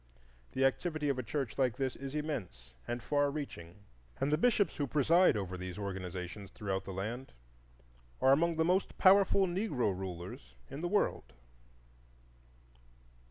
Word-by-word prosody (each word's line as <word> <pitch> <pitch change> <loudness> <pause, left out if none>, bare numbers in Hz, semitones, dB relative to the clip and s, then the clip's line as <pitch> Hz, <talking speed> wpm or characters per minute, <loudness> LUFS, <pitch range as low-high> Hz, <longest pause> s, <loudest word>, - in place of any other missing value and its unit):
The 135 +1 +2
activity 150 +2 0
of 135 -2 0
a - - +1
church 130 +1 -3
like 125 -4 +2
this 130 -2 -1
is 135 +1 -7
immense 100 - -4
and 120 0 -3
far 145 +1 +2
reaching, 105 - -7 0.4
and 135 +2 +1
the - - +5
bishops 210 -5 +2
who 145 - -1
preside 155 +2 +4
over 95 -2 -3
these 90 0 -6
organizations 95 0 -5
throughout 95 -2 -3
the - - -5
land 110 +8 -5 0.9
are 130 - +5
among 165 +4 +3
the 160 0 +2
most 185 +3 +1
powerful 195 0 +6
Negro 175 - 0
rulers 85 -9 -7 0.2
in 140 +3 -6
the 175 - -1
world. 195 - 0
130 Hz, 150 wpm, -33 LUFS, 95-155 Hz, 0.9 s, powerful